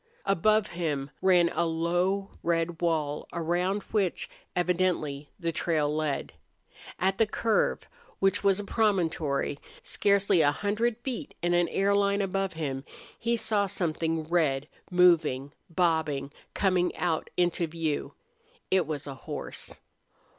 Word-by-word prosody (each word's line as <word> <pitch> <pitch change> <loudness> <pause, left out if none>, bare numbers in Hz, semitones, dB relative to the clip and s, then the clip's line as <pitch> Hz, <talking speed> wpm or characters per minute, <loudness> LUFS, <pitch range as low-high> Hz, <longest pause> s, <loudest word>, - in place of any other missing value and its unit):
Above 215 +3 +3
him 150 -5 -2
ran 180 -2 +5
a 170 - +1
low, 175 +4 0
red 165 0 0
wall, 155 -4 0
around 175 +4 0
which 200 -5 0 0.3
evidently 175 -5 0
the 170 -2 -1
trail 150 -2 0
led. 155 -3 -2 0.6
At 190 +2 0
the 225 - +4
curve, 220 0 0 0.3
which 195 +1 +2
was 200 -1 +3
a - - -3
promontory, 165 -10 0 0.2
scarcely 200 -3 +3
a 145 - +5
hundred 215 +7 0
feet 260 -3 -4
in 175 0 +2
an 175 0 +3
air 195 +4 +1
line 200 0 +2
above 195 0 -1
him, 140 -4 -3 0.4
he 235 0 +1
saw 205 -2 +1
something 165 -3 -1
red 155 -4 +1 0.2
moving, 170 -7 +3 0.2
bobbing, 160 -5 0 0.2
coming 185 -2 +2
out 165 -3 -1
into 175 -1 +2
view. 160 -2 -3 0.6
It 190 -1 +3
was 150 -2 -3
a 140 - -5
horse. 130 - -7
175 Hz, 130 wpm, -28 LUFS, 155-195 Hz, 0.6 s, ran